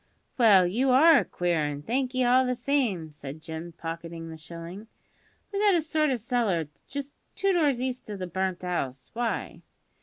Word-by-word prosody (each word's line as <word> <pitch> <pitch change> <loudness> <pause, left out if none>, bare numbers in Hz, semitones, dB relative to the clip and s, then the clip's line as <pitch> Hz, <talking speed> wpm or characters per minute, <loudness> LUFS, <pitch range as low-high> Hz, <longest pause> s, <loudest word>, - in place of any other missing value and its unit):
"Well, 205 -7 +6
you 240 +10 +1
are 285 +4 +7
a - - 0
queer 175 -3 0
'un; 145 -1 -3
thank'ee 255 - 0
all 250 +2 +5
the 250 0 0
same," 240 - 0
said 145 0 -9
Jim, 160 +1 -7
pocketing 165 0 -6
the - - -7
shilling. 170 +6 -9 0.7
"We've 400 - 0
got 410 -3 +5
a 335 - +3
sort 310 -1 +1
o' 265 - +2
cellar 225 - 0 0.2
just 280 0 -6 0.2
two 395 -1 +2
doors 295 -8 +2
east 255 -2 -3
o' 205 - -4
the 185 - -4
burnt 185 +1 -2
'ouse. 135 -8 -3
Why?" 235 -1 -3
210 Hz, 180 wpm, -27 LUFS, 165-260 Hz, 0.7 s, are